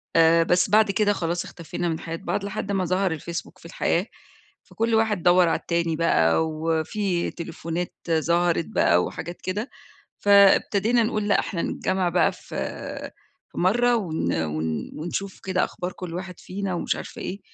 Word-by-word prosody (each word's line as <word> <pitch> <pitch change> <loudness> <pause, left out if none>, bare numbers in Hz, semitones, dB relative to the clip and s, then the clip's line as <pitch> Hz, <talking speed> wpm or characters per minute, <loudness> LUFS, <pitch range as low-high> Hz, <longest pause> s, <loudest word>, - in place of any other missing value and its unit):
آآ 165 0 +6
بس 180 +3 +2
بعد 215 0 +5
كده 205 0 +2
خلاص 170 -1 -2
اختفينا 170 +1 -4
من 160 0 -2
حياة 165 0 -5
بعض 200 +2 -3
لحد 200 0 -4
ما 190 -2 0
ظَهَر 185 -2 0
الFacebook 170 +2 -6
في - - -18
الحياة، 170 +3 0 0.6
فكل 225 0 -1
واحد 220 -5 +1
دوّر 175 -1 +5
على - - +1
التاني 170 -1 -1
بقى 160 - +3
وفي 165 +4 -1
تليفونات 170 0 -5 0.2
ظهرت 170 +1 +2
بقى 90 +1 +3
وحاجات 175 +1 -6
كده، 205 +7 -3 0.5
فابتدينا 200 +3 +5
نقول 215 -1 -1
لأ، 205 - +4
إحنا 170 - -3
نتجمّع 190 -1 -1
بقى 175 0 +3
في - - -17 1.0
في - - -8
مرّة 240 +6 +3
ون 160 - -1
ون 80 +1 -3
ونشوف 185 +4 -4
كده 185 -1 +1
أخبار 180 +1 -5
كل 175 -2 -7
واحد 180 0 -6
فينا، 195 -1 -4
ومش - - -1
عارفة - - -8
إيه 195 +2 -5
180 Hz, 160 wpm, -24 LUFS, 165-200 Hz, 1.0 s, آآ